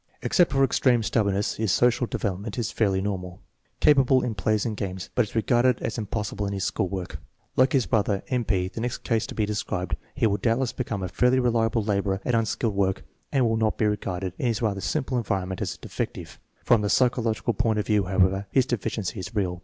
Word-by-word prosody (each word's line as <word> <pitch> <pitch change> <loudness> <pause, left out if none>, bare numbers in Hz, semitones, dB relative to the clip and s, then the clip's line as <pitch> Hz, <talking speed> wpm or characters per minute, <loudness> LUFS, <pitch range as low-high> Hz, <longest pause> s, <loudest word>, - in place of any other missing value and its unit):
Except 175 -6 +3
for 135 0 +3
extreme 125 -2 +3
stubbornness 100 -2 0
his 110 -3 0
social 120 +4 +3
development 100 +2 -3
is 120 -2 -1
fairly 100 -4 +1
normal. 90 -3 -4 0.4
Capable 135 -3 +5
in 120 - -1
plays 105 +2 0
and 110 -2 -2
games, 95 -2 -5
but - - +2
is 105 - -14
regarded 120 +2 +3
as 115 - -2
impossible 105 -1 -3
in 100 - -3
his 95 -1 -3
school 95 -1 -1
work. 95 -1 -5 0.4
Like 130 0 +4
his 130 -4 +3
brother, 105 -3 +1
M. 125 -2 0
P., 95 -4 0
the 110 +4 -6
next 120 +1 -3
case 115 -2 0
to - - -8
be 110 - +1
described, 95 -4 -2 0.2
he - - +1
will 105 -2 +2
doubtless 120 +2 0
become 110 -6 -3
a - - -1
fairly 125 +8 +2
reliable 115 -2 +1
laborer 100 -2 0
at 125 - 0
un 115 -1 +2
skilled 110 0 -1
work 95 -1 0 0.3
and 135 -4 +3
will 115 0 +1
not 110 -1 +1
be 110 - +1
regarded, 95 -3 -2
in 125 - 0
his 115 -3 0
rather 105 -4 -1
simple 130 - -1
environ 95 -4 -2
ment, 95 - -5
as - - -2
a - - -20
defective. - - -5 0.3
From 115 -3 +4
the 105 - -1
psychological 120 -1 +1
point 115 0 +1
of 105 - 0
view, 105 -3 +2
how 95 +1 -4
ever, 95 +2 +2
his 130 -2 +3
deficiency 110 -4 -3
is 105 +4 -7
real. 90 -4 -1
110 Hz, 225 wpm, -25 LUFS, 95-120 Hz, 0.4 s, Capable